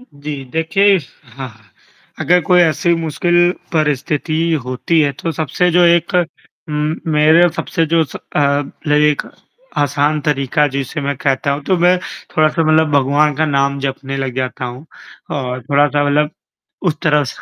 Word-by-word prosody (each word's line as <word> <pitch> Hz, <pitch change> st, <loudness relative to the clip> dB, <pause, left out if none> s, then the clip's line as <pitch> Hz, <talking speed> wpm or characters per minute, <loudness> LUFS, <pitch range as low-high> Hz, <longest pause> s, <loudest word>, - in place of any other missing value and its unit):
जी 145 Hz, -, -8 dB
देखिए 195 Hz, +5 st, +3 dB, 0.4 s
हाँ, 135 Hz, -2 st, -6 dB, 0.7 s
अगर 180 Hz, +4 st, +3 dB
कोई 180 Hz, +1 st, +4 dB
ऐसी 170 Hz, +1 st, +2 dB
मुश्किल 175 Hz, +2 st, +1 dB, 0.2 s
परिस्थिति 155 Hz, 0 st, -1 dB, 0.3 s
होती 130 Hz, +6 st, 0 dB
है 145 Hz, -2 st, +1 dB
तो 165 Hz, -, -2 dB
सबसे 160 Hz, +3 st, 0 dB
जो 175 Hz, +1 st, +4 dB
एक 170 Hz, +1 st, +2 dB, 0.6 s
म 150 Hz, +1 st, -1 dB, 0.2 s
मेरे 155 Hz, +3 st, +5 dB
सबसे 165 Hz, -3 st, -1 dB
जो 165 Hz, -1 st, +4 dB
अ, 145 Hz, 0 st, -2 dB, 0.2 s
एक 150 Hz, -1 st, +3 dB, 0.6 s
आसान 145 Hz, +2 st, +1 dB
तरीका 145 Hz, 0 st, +1 dB
जिसे 140 Hz, +2 st, -4 dB
मैं 140 Hz, 0 st, -2 dB
कहता 135 Hz, +1 st, 0 dB
हूँ। 145 Hz, +1 st, -4 dB
तो 185 Hz, -, +1 dB
मैं 180 Hz, +1 st, +4 dB, 0.4 s
थोड़ा-सा 155 Hz, +1 st, +2 dB
मतलब 155 Hz, 0 st, +3 dB
भगवान 145 Hz, +2 st, +2 dB
का 155 Hz, -, +1 dB
नाम 140 Hz, -1 st, 0 dB
जपने 135 Hz, 0 st, -4 dB
लग 135 Hz, -2 st, -3 dB
जाता 130 Hz, 0 st, -3 dB
हूँ 125 Hz, +3 st, -7 dB, 0.5 s
और 125 Hz, -1 st, -4 dB
थोड़ा-सा 145 Hz, +2 st, +2 dB
मतलब 150 Hz, +1 st, +1 dB, 0.6 s
उस 155 Hz, -, +1 dB
तरफ 150 Hz, -3 st, +2 dB
150 Hz, 145 wpm, -16 LUFS, 140-165 Hz, 0.7 s, मेरे